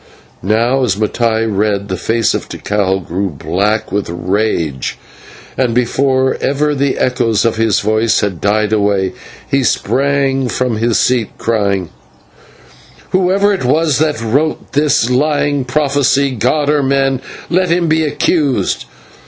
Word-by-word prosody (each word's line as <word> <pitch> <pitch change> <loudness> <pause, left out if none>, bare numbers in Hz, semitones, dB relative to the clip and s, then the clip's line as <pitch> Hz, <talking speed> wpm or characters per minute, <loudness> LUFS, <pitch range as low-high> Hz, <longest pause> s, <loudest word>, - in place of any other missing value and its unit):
Now, 115 +7 +1
as 105 -7 +1
Mattai 110 +1 0
read, 100 -1 -1
the 95 - -3
face 110 +5 0
of - - -4
Tikal 95 -2 -1
grew 95 +3 -2
black 90 +9 -1
with 100 -1 -2
rage, 85 - -2 0.6
and 125 -3 0
before 130 +2 +1
ever 150 +2 0
the 140 -1 0
echoes 120 -4 +1
of 115 - +1
his 110 -2 +2
voice 110 +1 +1
had 95 -6 -3
died 105 +1 +1
away, 100 -3 +1 0.3
he 135 -1 +1
sprang 135 0 +1
from 125 -3 -1
his 115 +1 +1
seat 125 -4 +1
crying: 100 -6 -1 1.2
"Whoever 190 +2 +2
it 190 - -3
was 150 +3 +2
that 155 -1 0
wrote 135 +8 -1
this 145 -4 +2
lying 145 0 +1
prophecy, 140 0 +1
god 130 +5 0
or 150 0 +2
man, 135 -1 +1 0.3
let 185 0 +2
him 170 0 +1
be 160 0 +2
accursed. 150 -2 0
120 Hz, 135 wpm, -15 LUFS, 105-140 Hz, 1.2 s, his